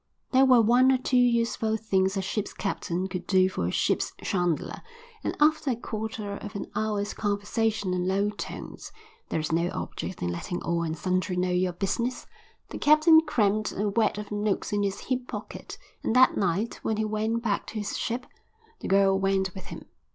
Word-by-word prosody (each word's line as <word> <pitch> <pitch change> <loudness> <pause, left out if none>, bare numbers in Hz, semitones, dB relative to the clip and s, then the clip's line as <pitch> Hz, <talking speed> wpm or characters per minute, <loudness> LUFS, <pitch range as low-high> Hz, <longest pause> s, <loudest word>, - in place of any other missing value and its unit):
There 265 +1 +6
were 250 -2 +7
one 250 +4 +5
or 260 - +4
two 255 0 -2
useful 235 -2 +2
things 190 -3 +1
a 195 - -1
ship's 210 +2 -3
captain 185 -2 -2
could 180 -1 -6
do 185 -1 +4
for 90 - -2
a - - -1
ship's - - 0
chandler, 175 -4 -1 0.4
and - - -3
after 305 -1 +3
a 250 - +1
quarter 215 -2 -5
of 205 0 -9
an 200 - -3
hour's 210 -1 -1
conversation 205 -1 -1
in 180 0 -1
low 200 +2 +1
tones 210 - -8 0.4
(there - - -1
is 155 - -3
no 170 +2 +1
object 185 - -5
in 85 - 0
letting 175 - -4
all 170 0 0
and 160 -1 -2
sundry 185 +2 -1
know 180 0 +1
your 180 0 +1
business), 235 +7 -2 0.4
the - - -6
captain 310 +2 +6
crammed 215 -5 +1
a 205 +1 0
wad 215 0 +1
of 210 0 -7
notes 210 0 -1
in 205 - +1
his 200 -1 -2
hip 255 -1 -2
pocket, 210 -3 -7 0.2
and 225 - -1
that 255 0 +6
night, 200 +4 -1
when 220 - -1
he 220 - 0
went 220 +2 -1
back 205 -3 -1
to - - -9
his 210 -2 -3
ship, 250 +2 -2 0.5
the - - -6
girl 195 0 +4
went 195 -1 +1
with 190 - -9
him. - - -9
205 Hz, 195 wpm, -27 LUFS, 190-230 Hz, 0.5 s, were